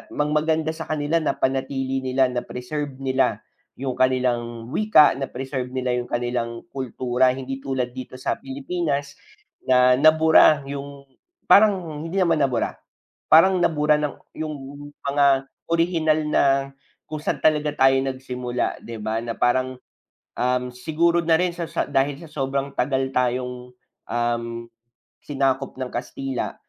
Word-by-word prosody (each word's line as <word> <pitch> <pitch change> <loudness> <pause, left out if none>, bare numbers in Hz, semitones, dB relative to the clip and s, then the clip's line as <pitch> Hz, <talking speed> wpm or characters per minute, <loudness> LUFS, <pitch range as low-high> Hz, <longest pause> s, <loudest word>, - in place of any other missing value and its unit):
mag 150 0 0
maganda 160 +1 +1
sa 160 0 -7
kanila 155 +2 0
napanatili 135 -2 -1
nila, 130 0 +2
na-preserve 130 +3 -4
nila 135 -1 0 0.3
''yong 130 0 -3
kanilang 120 -2 0
wika, 210 -9 +5
na-preserve 130 -1 -4
nila 125 -1 -1
'yong 120 - -5
kanilang 120 -1 -2
kultura, 130 -1 0
hindi 135 0 -5
tulad 130 -3 -2
dito 130 0 -8
sa - - -1
Pilipinas 140 +1 -3 0.5
na 125 0 +5
nabura 155 -1 +6
'yong 140 0 -7 0.5
parang 185 -7 +4
hindi 180 - -6
naman 170 -4 +3
nabura, 130 -4 0 0.6
parang 185 +4 +7
nabura 150 -2 +3
ng 150 -2 -2 0.2
'yong 155 -1 -3 0.5
mga 140 0 +2 0.5
orihinal 165 -2 +2
na - - +3 0.7
kung 155 - -4
sa'n 150 - -2
talaga 150 -1 +2
tayo 135 -1 +5
nagsimula, 125 -2 -3
'di 115 - -7
ba, 110 +1 -1
na 115 - -3
parang, 130 +1 +1 0.6
um, 125 0 0
siguro 170 +5 +1
na 160 0 +4
rin 180 -1 0
sa 170 - -4
sa - - -1
dahil 135 +1 +1
sa 165 - -11
sobrang 135 0 -2
tagal 130 +1 0
tayong, 125 0 -1 0.4
um, 115 0 -2 0.6
sinakop 135 -1 -1
ng 130 - -2
Kastila 130 +1 -4
135 Hz, 135 wpm, -23 LUFS, 125-155 Hz, 0.7 s, parang